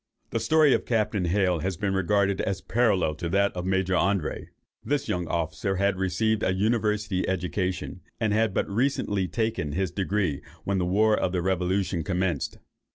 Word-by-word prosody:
The - - 0
story 155 -3 +4
of - - 0
Captain 105 -5 +1
Hale 90 -1 +2
has 95 +2 -2
been 100 +1 -1
regarded 100 +1 +1
as 100 -2 -2
parallel 100 -8 +1
to 85 +2 -4
that 100 +2 +2
of 90 0 -3
Major 95 0 +1
André. 95 -2 0 0.4
This 145 -1 -1
young 90 -1 -1
officer 80 +4 -1
had 100 +1 +1
received 95 +4 0
a 95 - +1
university 105 -2 0
education, 90 0 -2 0.2
and 110 -3 +1
had 110 0 +2
but - - -1
recently 105 -4 0
taken 110 -9 -2
his 95 +1 -1
degree 95 -5 -1 0.2
when 100 -1 0
the 90 - 0
war 105 +4 +3
of 90 - -1
the 90 -2 0
revolution 95 -1 0
commenced. 90 -3 -1
95 Hz, 170 wpm, -26 LUFS, 90-105 Hz, 0.4 s, story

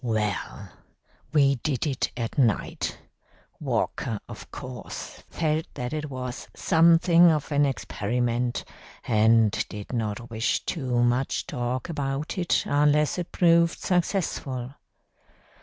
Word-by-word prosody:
"Well, 110 -4 -2 0.6
we 140 -3 +4
did 135 +1 -1
it 135 -4 -1
at 115 -2 -3
night. 120 -8 0 0.6
Walker, 110 -3 -1
of - - -10
course, - - -8
felt 160 -1 -1
that 125 +2 -4
it 150 -1 -3
was 125 -2 -6
something 170 +1 +5
of 155 -2 0
an 145 0 +3
experiment, 120 -1 -1 0.4
and 110 -1 +4 0.2
did 105 +3 -8
not 115 +1 -3
wish 110 +1 0
too 125 -7 0
much 125 +2 +1
talk 125 0 -3
about 145 +2 -3
it 175 - +2
unless 150 +3 +2
it 175 - -5
proved 170 -1 +4
successful. 160 -8 -1
135 Hz, 115 wpm, -26 LUFS, 120-155 Hz, 0.6 s, something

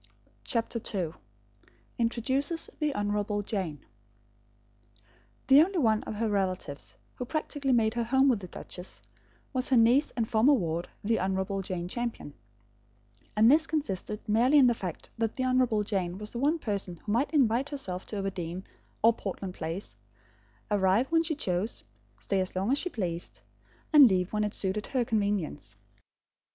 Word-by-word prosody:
CHAPTER 230 0 -2 0.2
II 165 -4 -2 0.9
INTRODUCES 265 +7 0
THE 300 -1 +1
HONOURABLE 205 0 -1
JANE 185 -9 -3 1.6
The 275 +2 +8
only 375 +3 +1
one 220 -8 +3
of - - -5
her 225 +2 0
relatives 185 -8 -2 0.2
who 250 - -4
practically 290 -1 -2
made 225 -3 +3
her 235 -1 -1
home 265 +3 +4
with 245 -6 +3
the 185 - -8
duchess 180 +1 -8 0.5
was 255 -1 +1
her 260 - +4
niece 240 +6 +5
and 225 -2 +1
former 230 +7 +4
ward, 170 -5 -2
the 225 +2 +1
Honourable 190 +1 -1
Jane 180 -2 -4
Champion; 235 -8 -4 1.0
and 220 +3 +6
this 315 +2 +4
consisted 210 - -3
merely 240 +7 +4
in 275 - +7
the 240 - +5
fact 185 -7 -6
that 225 -1 0
the 255 - -1
Honourable 255 -4 +2
Jane 190 -4 -2
was 210 +1 -7
the 235 - -4
one 295 +5 +2
person 200 - -3
who 205 - -6
might 240 +7 +2
invite 265 -2 +2
herself 190 -11 -4
to - - -6
Overdene 185 -2 -4 0.4
or 230 +1 +7
Portland 195 -3 -5
Place, 165 +5 -5 0.8
arrive 205 - +2
when 325 0 +4
she 325 -1 0
chose, 190 -5 -2 0.3
stay 145 - -1
as 185 - -3
long 195 +6 0
as 280 - +3
she 360 - -2
pleased, 175 - -4 0.5
and 290 -3 +10
leave 185 -2 0
when 210 0 +1
it 210 0 -2
suited 200 +2 -2
her 255 -3 0
convenience. 200 - -1
215 Hz, 160 wpm, -29 LUFS, 190-255 Hz, 1.6 s, and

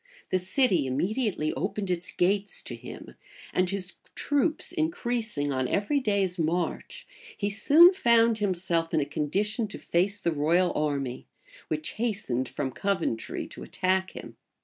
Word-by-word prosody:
The 185 - +2
city 185 - +2
immediately 180 - -1
opened 190 +5 -2
its 175 0 -2
gates 200 +3 0
to - - -5
him; - - -10 0.4
and 185 0 +2
his 195 -1 -2 0.2
troops 295 +3 0
increasing 240 - -1
on 130 -1 0
every 210 - +1
day's 200 -6 0
march, 175 - -2 0.3
he 205 0 -1
soon 315 - +7
found 235 - +4
himself 175 -4 0
in - - +4
a 145 - 0
condition 200 - -1
to 205 - -7
face 195 +4 0
the 170 - 0
royal 170 +5 +2
army, 140 -4 -2 0.4
which 155 0 -2
hastened 130 - -1
from 130 - -3
Coventry 170 - -2
to - - -9
attack 190 0 0
him. - - -9
190 Hz, 145 wpm, -27 LUFS, 160-220 Hz, 0.4 s, soon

